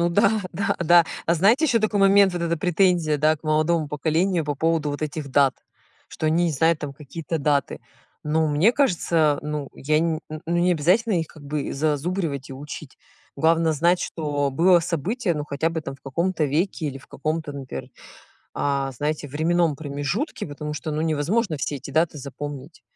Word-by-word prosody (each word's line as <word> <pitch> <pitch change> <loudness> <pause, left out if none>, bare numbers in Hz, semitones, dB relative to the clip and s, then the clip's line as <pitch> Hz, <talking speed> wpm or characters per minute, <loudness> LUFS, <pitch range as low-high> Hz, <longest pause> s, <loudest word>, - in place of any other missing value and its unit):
Ну 170 - +3
да-да-да. 185 -3 +3 0.2
А 170 - +3
знаете 220 - +4
еще 245 -6 +3
такой 210 -2 0
момент, 195 0 +6
вот 175 -1 -3
эта 170 0 0
претензия, 175 -2 +2
да, 155 +2 +3
к 145 - -30
молодому 155 0 +1
поколению 165 +4 0
по 145 -1 -2
поводу 160 0 0
вот 145 +1 -5
этих 150 -1 -4
дат? 135 -1 +4 0.5
Что 155 - -4
они 165 +3 +3
не - - +1
знают 160 +3 +2
там 145 -2 -5
какие-то 155 +3 -5
даты. 145 -1 0 0.4
Ну, 155 +1 +1
мне 155 +10 +3
кажется, 165 - +2
ну 150 -2 -4
я 150 +2 +1
не 160 -1 0
ну 155 0 -7 0.2
не 175 +1 +3
обязательно 185 +8 +2
их 165 - -2
как 150 - -15
бы 145 0 -3
зазубривать 150 -1 -2
и - - -5
учить. 140 +1 -9 0.4
Главное 160 +2 +2
знать, 170 +4 +2
что 145 -3 -2
было 175 +6 +5
событие, 175 - -1
ну, 150 -1 -3
хотя 150 +2 -1
бы 165 -1 -3
там 135 -3 -6
в - - -33
каком-то 170 +4 -1
веке 160 +3 -1
или 135 -2 -4
в 135 - -18
каком-то, 155 +1 -3
например, 135 - -7 0.6
а, 140 -1 -1
знаете, 145 +3 -3
временном 160 +2 +1
промежутке, 145 - -3
потому 150 0 -6
что, 155 +1 -5
ну, 150 0 -2
невозможно 160 +5 0
все 145 +1 -3
эти 140 - -9
даты 160 0 +1
запомнить. 145 +2 -8
155 Hz, 180 wpm, -23 LUFS, 145-175 Hz, 0.6 s, момент